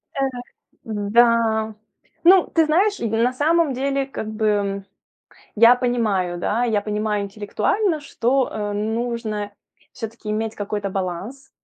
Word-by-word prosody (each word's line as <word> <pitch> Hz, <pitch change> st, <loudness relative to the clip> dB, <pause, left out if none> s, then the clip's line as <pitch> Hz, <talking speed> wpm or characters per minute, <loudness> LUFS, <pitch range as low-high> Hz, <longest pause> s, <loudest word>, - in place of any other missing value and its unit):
Э. 275 Hz, -, -1 dB, 0.6 s
Да. 220 Hz, +1 st, +2 dB, 0.5 s
Ну, 370 Hz, +1 st, +6 dB
ты 325 Hz, -1 st, +4 dB
знаешь, 380 Hz, +7 st, +2 dB
и 230 Hz, -, -1 dB
на 230 Hz, +3 st, +1 dB
самом 310 Hz, +1 st, +2 dB
деле 275 Hz, +1 st, -1 dB
как 245 Hz, -5 st, -6 dB
бы, 215 Hz, 0 st, -2 dB
м, 200 Hz, -2 st, 0 dB, 0.7 s
я 230 Hz, +3 st, +8 dB
понимаю, 215 Hz, -8 st, 0 dB
да, 220 Hz, +7 st, 0 dB
я 220 Hz, -4 st, +1 dB
понимаю 210 Hz, 0 st, -1 dB
интеллектуально, 215 Hz, -, -1 dB
что, 265 Hz, -2 st, 0 dB
э, 210 Hz, -1 st, -3 dB
нужно 220 Hz, 0 st, -2 dB, 0.4 s
всё-таки 225 Hz, -2 st, -7 dB
иметь 220 Hz, +1 st, -2 dB
какой-то 205 Hz, -1 st, -3 dB
баланс. 195 Hz, +9 st, -5 dB
225 Hz, 130 wpm, -22 LUFS, 210-255 Hz, 0.7 s, я